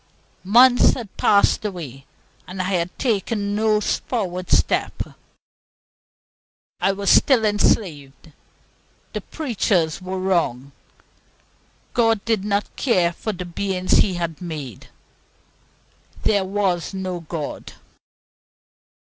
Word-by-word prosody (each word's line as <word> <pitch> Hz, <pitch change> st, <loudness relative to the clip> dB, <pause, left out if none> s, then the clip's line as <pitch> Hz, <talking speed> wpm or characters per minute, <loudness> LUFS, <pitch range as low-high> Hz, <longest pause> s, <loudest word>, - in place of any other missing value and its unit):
Months 245 Hz, +5 st, +6 dB
had 225 Hz, -6 st, -8 dB
passed 205 Hz, +2 st, +3 dB
away, 155 Hz, -, -6 dB, 0.4 s
and 185 Hz, +1 st, -8 dB
I 185 Hz, -, 0 dB
had 175 Hz, 0 st, -2 dB
taken 205 Hz, -3 st, -1 dB
no 215 Hz, 0 st, +2 dB
forward 185 Hz, -4 st, -2 dB
step. -, -, +1 dB, 1.8 s
I 195 Hz, -, +2 dB
was 200 Hz, 0 st, 0 dB
still 250 Hz, -6 st, +5 dB
enslaved. 165 Hz, -9 st, 0 dB, 0.8 s
The -, -, -3 dB
preachers 195 Hz, -, -1 dB
were 185 Hz, +1 st, -4 dB
wrong; 170 Hz, -9 st, -1 dB, 1.2 s
God 225 Hz, -4 st, +2 dB
did 225 Hz, -4 st, 0 dB
not 205 Hz, 0 st, -2 dB
care 180 Hz, -10 st, +2 dB
for 215 Hz, -, -4 dB
the 180 Hz, -2 st, -6 dB
beings 185 Hz, +1 st, 0 dB
He 190 Hz, -3 st, +2 dB
had 170 Hz, -2 st, -4 dB
made. 150 Hz, -, -7 dB, 1.4 s
There 200 Hz, -3 st, +2 dB
was 190 Hz, -2 st, -1 dB
no 185 Hz, -2 st, -4 dB
God. 160 Hz, -2 st, -6 dB
190 Hz, 105 wpm, -22 LUFS, 175-210 Hz, 1.8 s, Months